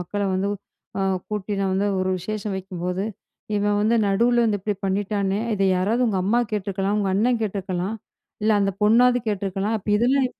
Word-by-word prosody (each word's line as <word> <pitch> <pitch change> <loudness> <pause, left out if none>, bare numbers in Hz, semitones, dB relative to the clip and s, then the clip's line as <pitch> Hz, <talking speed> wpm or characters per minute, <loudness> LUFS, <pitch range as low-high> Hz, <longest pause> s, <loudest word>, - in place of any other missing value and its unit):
மக்களை 200 +3 -2
வந்து 195 +2 0 0.5
அ - - 0 0.3
கூட்டி, 210 -1 -3
நான் 195 -1 0
வந்து 200 +2 +1
ஒரு 185 0 0
விசேஷம் 210 +2 -4
வைக்கும்போது, 185 0 -3 0.5
இவன் 205 0 +1
வந்து 225 +3 +3
நடுவுல 235 +4 +3
வந்து 210 -2 +1
இப்டி 210 +1 -1
பண்ணிட்டானே! 200 0 0 0.2
இத 195 - -1
யாராவது 220 +7 +1
உங்க 200 -4 0
அம்மா 235 +5 +3
கேட்டுருக்கலாம், 200 0 -1
உங்க 200 -2 0
அண்ணன் 230 +4 +2
கேட்டுருக்கலாம், 195 -1 -2 0.5
இல்ல 220 - +3
அந்த 195 0 +1
பொண்ணாவது 245 +4 +5
கேட்டுருக்கலாம்." 200 +2 -1
அப்ப 210 - -13
இதெல்லாம் 260 +3 +3
205 Hz, 165 wpm, -23 LUFS, 195-215 Hz, 0.5 s, பொண்ணாவது